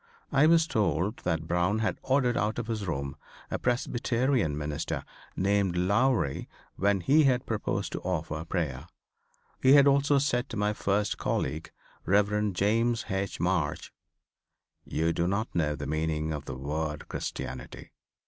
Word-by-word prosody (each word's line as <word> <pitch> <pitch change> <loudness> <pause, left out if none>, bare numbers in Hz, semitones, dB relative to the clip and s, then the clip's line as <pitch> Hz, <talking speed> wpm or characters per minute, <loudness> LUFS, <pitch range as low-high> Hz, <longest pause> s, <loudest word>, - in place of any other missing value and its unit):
I 145 +2 +5
was 165 0 +5
told 100 - 0
that 80 -2 -1
Brown 90 +5 +1
had 110 0 -1
ordered 130 -3 +2
out 105 +1 0
of 120 - -2
his 110 -4 -3
room 70 -4 -3 0.4
a - - -1
Presbyterian 120 - 0
minister 75 -1 -3 0.3
named 100 -2 +1
Lowrey 100 - +1 0.3
when 100 0 +1
he 145 - +4
had 125 -2 +2
proposed 110 -2 -2
to - - -4
offer 80 -3 -3
prayer. 80 -7 -3 0.7
He 130 +1 +6
had 140 -1 +8
also 140 0 +4
said 130 -2 0
to 115 - -5
my 105 +1 +1
first 105 +1 0
colleague, 80 +1 -2 0.3
Rev. 105 +2 +2
James 115 +5 +1
H. 95 0 -2
March, 85 -4 -1 0.9
"You 80 +2 0
do 85 +1 0
not 100 +4 -1
know 75 -3 +1
the 75 - -6
meaning 80 +1 -1
of 75 -1 -5
the 65 - -5
word 75 +3 -3
Christianity. 65 +1 -6
100 Hz, 150 wpm, -28 LUFS, 80-120 Hz, 0.9 s, had